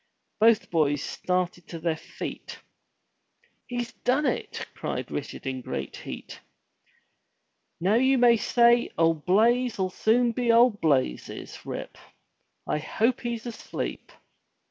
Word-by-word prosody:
Both 225 0 +4
boys 145 -3 +2
started 180 -1 -2
to 170 - -7
their 160 0 0
feet. 160 - -8 1.1
"He's 240 -1 -4
done 270 +4 0
it!*' - - -2
cried - - -4
Richard - - -5
in 130 -1 -3
great - - -5
heat. - - -8 1.4
"Now 185 +5 +2
you 260 +3 +4
may 240 -1 +6
say 235 +2 +4
old 165 -1 +2
Blaize'll 220 -1 +3
soon 235 +5 +2
be 235 0 +1
old 230 -2 +5
Blazes, 130 - -1
Rip. - - -6 0.7
I 150 - -1
hope 225 - 0
he's 235 -1 -4
asleep. 235 -2 -5
220 Hz, 120 wpm, -26 LUFS, 165-240 Hz, 1.4 s, may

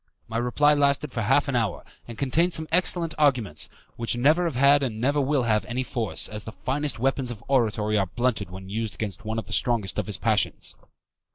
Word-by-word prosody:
My 115 - -3
reply 145 +5 +3
lasted 140 0 +1
for 115 - -3
half 145 +8 +2
an 135 - -1
hour, 110 -6 -1 0.2
and 115 -2 -8
contained 165 +8 +1
some 160 0 0
excellent 170 -1 +2
arguments, 125 - +1 0.3
which 115 +1 -1
never 155 +8 +3
have 165 -6 -2
had 140 +3 +5
and 115 -5 -2
never 140 +5 +2
will 140 -1 +1
have 110 -3 +2
any 125 +2 -2
force, 115 -5 -1
as 105 0 -5
the 115 - -7
finest 140 +2 -1
weapons 130 +1 0
of 115 -2 -6
oratory 110 -5 +1
are 95 - 0
blunted 120 -1 -1
when 95 +1 -9
used 110 +1 -3
against 105 -1 -5
one 110 +1 -3
of 110 - -3
the 110 - -7
strongest 110 -5 0
of 105 - -2
the 105 -3 -3
passions. 110 -1 0
120 Hz, 210 wpm, -25 LUFS, 110-140 Hz, 0.3 s, had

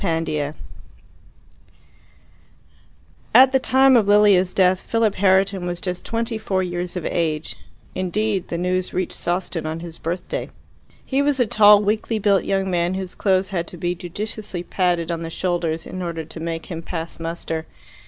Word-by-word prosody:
Chapter 160 -4 -1
5 - - -24 2.8
At 260 0 +8
the 265 - +3
time 265 +1 +5
of 220 -4 +4
Lilia's 205 -3 +4
death 185 -1 +4
Philip 225 -1 0
Herriton 190 -1 +2
was 175 0 -3
just 180 -1 -4
twenty 230 0 -2
four 190 -3 -1
years 175 0 -3
of 175 - -5
age 160 -2 -1 0.4
indeed 195 +1 -1
the 170 - -3
news 180 +1 -1
reached 185 0 -2
Sawston 175 -2 -2
on 160 +1 -4
his 170 -1 -9
birthday. 175 +2 -4 0.6
He 270 +1 +1
was 285 -1 +1
a 245 - +4
tall, 210 -1 +6
weakly 215 +2 0
built 200 -2 +2
young 195 -1 0
man, 175 +1 0
whose 190 -1 -5
clothes 190 -1 +1
had 170 -4 -2
to 180 - -9
be 175 +1 -1
judiciously 185 +1 -6
padded 175 -2 0
on 165 -1 -3
the 165 - -5
shoulders 170 -2 -2
in 185 - -6
order 165 -2 -4
to 160 - -9
make 165 0 -4
him 165 -2 -6
pass 165 0 -6
muster. 165 -1 -4
180 Hz, 165 wpm, -22 LUFS, 170-205 Hz, 2.8 s, At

